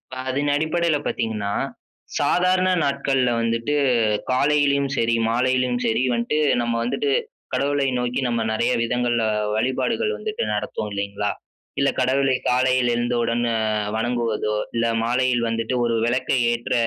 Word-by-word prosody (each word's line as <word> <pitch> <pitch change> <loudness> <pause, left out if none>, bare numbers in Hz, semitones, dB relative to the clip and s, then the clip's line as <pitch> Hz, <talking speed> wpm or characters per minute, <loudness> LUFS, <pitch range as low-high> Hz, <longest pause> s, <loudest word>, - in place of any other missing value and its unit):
இப்ப 130 - -12
அதன் 145 +2 0
அடிப்படைல 160 0 +1
பாத்தீங்கன்னா, 105 -3 -2 0.7
சாதாரண 185 +1 +2 0.2
நாட்கள்ல 135 -2 +1
வந்துட்டு 115 +4 -1 0.6
காலையிலயும் 140 +1 +2
சரி, 115 0 +2
மாலையிலயும் 125 +1 +1
சரி, 115 +2 +1
வந்துட்டு 120 +5 -1 0.3
நம்ம 120 0 -1
வந்துட்டு 135 +3 -1 0.4
கடவுளை 140 0 +1
நோக்கி 125 +2 -1
நம்ம 115 -1 0
நெறைய 115 +3 +1
விதங்கள்ல 120 -1 0 0.3
வழிபாடுகள் 130 - 0
வந்துட்டு 440 +2 -4
நடத்துவோம் 105 - -3
இல்லைங்களா? 100 +1 -2 0.5
இல்ல 140 - +3
கடவுளை 135 +1 +2
காலையில 125 -1 +2
எழுந்தவுடன் 120 0 0
அ - - 0 0.4
வணங்குவதோ, 115 -2 -1 0.2
இல்ல 115 0 +1 0.2
மாலையில் 120 0 +1
வந்துட்டு 115 +2 -2
ஒரு 115 -1 +1
வெளக்க 125 +2 -1 0.2
ஏற்ற 120 0 -3
125 Hz, 125 wpm, -22 LUFS, 115-140 Hz, 0.7 s, இல்ல